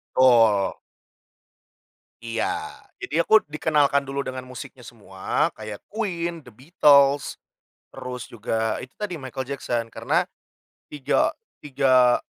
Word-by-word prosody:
Betul. 115 Hz, -6 st, +4 dB, 1.5 s
Iya. 115 Hz, -1 st, -2 dB, 0.6 s
Jadi -, -, -6 dB
aku 215 Hz, +5 st, +5 dB
dikenalkan 145 Hz, -2 st, +1 dB
dulu 140 Hz, +1 st, -3 dB
dengan 130 Hz, -1 st, -6 dB
musiknya 130 Hz, -1 st, -10 dB
semua 95 Hz, -5 st, -2 dB
kayak 110 Hz, -1 st, -8 dB
Queen, 170 Hz, -6 st, -3 dB
The 125 Hz, -, -14 dB
Beatles, 140 Hz, 0 st, +3 dB, 0.6 s
terus 125 Hz, -1 st, -6 dB
juga 110 Hz, 0 st, -2 dB
itu 125 Hz, -, -11 dB
tadi 205 Hz, -4 st, -4 dB
Michael 130 Hz, 0 st, -6 dB
Jackson, 120 Hz, -4 st, -3 dB
karena -, -, 0 dB, 0.7 s
tiga 145 Hz, -3 st, +1 dB, 0.3 s
tiga, 130 Hz, -3 st, +4 dB
130 Hz, 105 wpm, -24 LUFS, 120-145 Hz, 1.5 s, aku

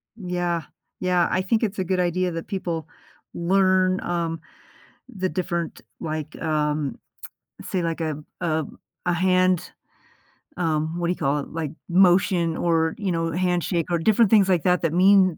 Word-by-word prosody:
Yeah. 175 Hz, -4 st, -2 dB, 0.4 s
Yeah, 180 Hz, -1 st, +2 dB
I 185 Hz, -, +2 dB
think 220 Hz, +5 st, +1 dB
it's 210 Hz, -2 st, -1 dB
a 190 Hz, -, 0 dB
good 185 Hz, +1 st, -1 dB
idea 180 Hz, +1 st, +1 dB
that 165 Hz, 0 st, -5 dB
people 170 Hz, -5 st, -3 dB, 0.5 s
learn, 185 Hz, +1 st, +2 dB
um, 165 Hz, -2 st, -2 dB, 0.7 s
the 185 Hz, -2 st, -3 dB
different, 170 Hz, -3 st, -3 dB, 0.2 s
like, 155 Hz, -2 st, -4 dB
um 150 Hz, -3 st, -1 dB, 0.6 s
say, 185 Hz, -, -2 dB
like, 165 Hz, 0 st, -2 dB
a 155 Hz, -2 st, -1 dB, 0.2 s
a 160 Hz, -2 st, 0 dB, 0.4 s
a 180 Hz, -, +3 dB
hand, 185 Hz, 0 st, +2 dB, 0.9 s
um, 160 Hz, -1 st, -1 dB
what 170 Hz, -, 0 dB
do 175 Hz, -, +1 dB
you -, -, -1 dB
call 140 Hz, +2 st, +1 dB
it, 140 Hz, -, -6 dB
like, 160 Hz, -3 st, -4 dB, 0.2 s
motion 175 Hz, -2 st, +3 dB
or, 165 Hz, -1 st, +1 dB
you 200 Hz, -3 st, -2 dB
know, 165 Hz, -1 st, -1 dB
handshake 175 Hz, -1 st, 0 dB
or 175 Hz, -, +2 dB
different 220 Hz, +4 st, +4 dB
things 200 Hz, -3 st, +5 dB
like 175 Hz, -4 st, +2 dB
that 180 Hz, -1 st, +3 dB
that 165 Hz, -, +1 dB
mean 185 Hz, -1 st, +5 dB
175 Hz, 160 wpm, -24 LUFS, 165-185 Hz, 0.9 s, things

